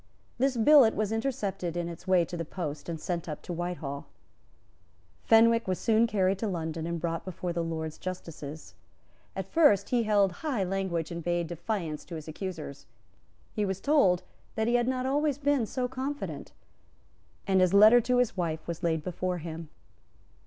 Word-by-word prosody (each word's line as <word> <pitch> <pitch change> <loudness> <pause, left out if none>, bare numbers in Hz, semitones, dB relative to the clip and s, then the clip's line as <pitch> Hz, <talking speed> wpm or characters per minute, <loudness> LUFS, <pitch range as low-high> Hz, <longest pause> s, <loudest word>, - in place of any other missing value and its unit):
This 265 -1 +2
billet 240 -1 +6
was 215 0 -1
intercepted 200 -8 -2
in 170 -1 -2
its 170 +2 -9
way 185 -2 +4
to 175 - -7
the 165 - -3
post, 155 -2 -5
and 165 -1 -4
sent 170 -1 -3
up 150 - -6
to 175 - -5
Whitehall. 170 -5 -4 1.1
Fenwick 230 0 +5
was 185 -1 0
soon 225 +1 +3
carried 195 -3 +1
to 220 - -1
London 165 -3 -3
and 170 0 -2
brought 165 0 -2
before 180 -1 -4
the 170 0 -1
Lords 160 -1 -4
Justices. 160 -4 -7 0.6
At 190 - -3
first 205 - +4
he 245 -1 +2
held 205 -3 +3
high 270 -11 0
language 180 -4 -2
and 170 -1 -5
bade 175 0 0
defiance 170 -2 -4
to 170 - -7
his 155 -1 -8
accusers. 160 - -6 0.7
He 210 - -1
was 190 -1 -2
told 195 - +3 0.3
that 220 0 0
he 240 - +2
had 240 0 +2
not 255 0 -1
always 285 +1 +1
been 285 -5 +1
so 250 +2 -2
confident; 270 +3 -5 0.9
and 190 -2 +3
his 185 -1 +4
letter 215 +4 +8
to 250 +2 +1
his 245 -5 +2
wife 160 -3 -3
was 170 0 -4
laid 160 -3 0
before 180 +1 -2
him. 165 -1 -7
185 Hz, 175 wpm, -29 LUFS, 170-225 Hz, 1.1 s, letter